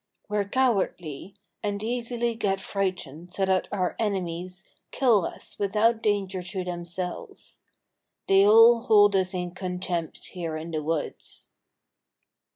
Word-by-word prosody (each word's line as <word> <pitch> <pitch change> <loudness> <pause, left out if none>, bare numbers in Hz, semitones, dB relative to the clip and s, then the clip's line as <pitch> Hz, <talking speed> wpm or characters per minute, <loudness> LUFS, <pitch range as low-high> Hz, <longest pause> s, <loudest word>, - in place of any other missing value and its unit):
We're 205 -1 -1
cowardly, 195 - -1 0.3
and 205 0 -3
easily 235 0 -1
get 200 -4 -1
frightened 180 -4 -4
so 195 - +1
that 190 -1 +1
our 185 -3 -1
enemies 185 -3 -3 0.2
kill 230 -9 +3
us - - -9
without 220 +3 +2
danger 200 -3 0
to 180 +1 -4
themselves. 175 0 -6 0.7
They 195 0 +6
all 225 +3 +7
hold 205 -4 +5
us 190 0 +1
in 180 -1 -3
contempt 180 -2 -4
here 165 -4 -4
in 160 +2 -7
the 155 -1 -2
woods." 155 0 -4
190 Hz, 125 wpm, -26 LUFS, 180-210 Hz, 0.7 s, all